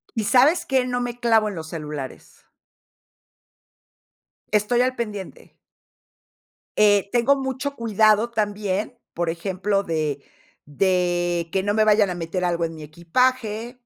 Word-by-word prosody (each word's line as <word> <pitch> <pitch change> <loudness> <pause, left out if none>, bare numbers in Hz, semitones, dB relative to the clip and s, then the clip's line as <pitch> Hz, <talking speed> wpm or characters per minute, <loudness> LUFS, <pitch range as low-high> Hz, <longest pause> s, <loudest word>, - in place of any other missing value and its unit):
¿Y 220 - -1
sabes 275 - +4
qué? 260 -2 +1
No 245 0 -1
me 245 0 -4
clavo 225 -3 +3
en 200 - -7
los 160 -1 -7
celulares. 150 -5 -8 2.1
Estoy 215 +4 +2
al 255 0 +1
pendiente. 210 -5 -7 1.3
Eh, 205 -1 +4
tengo 245 +3 +3
mucho 265 +1 -3
cuidado 220 0 +3
también, 210 +1 -2 0.2
por 170 0 -2
ejemplo, 190 +4 -1
de 155 -5 -2 0.5
de 175 0 0
que 190 -1 +1
no 205 0 0
me 215 0 +3
vayan 210 -2 +4
a - - -2
meter 175 +2 -4
algo 170 -1 0
en 165 0 -6
mi 155 - -9
equipaje, 225 - -1
205 Hz, 135 wpm, -23 LUFS, 175-235 Hz, 2.1 s, sabes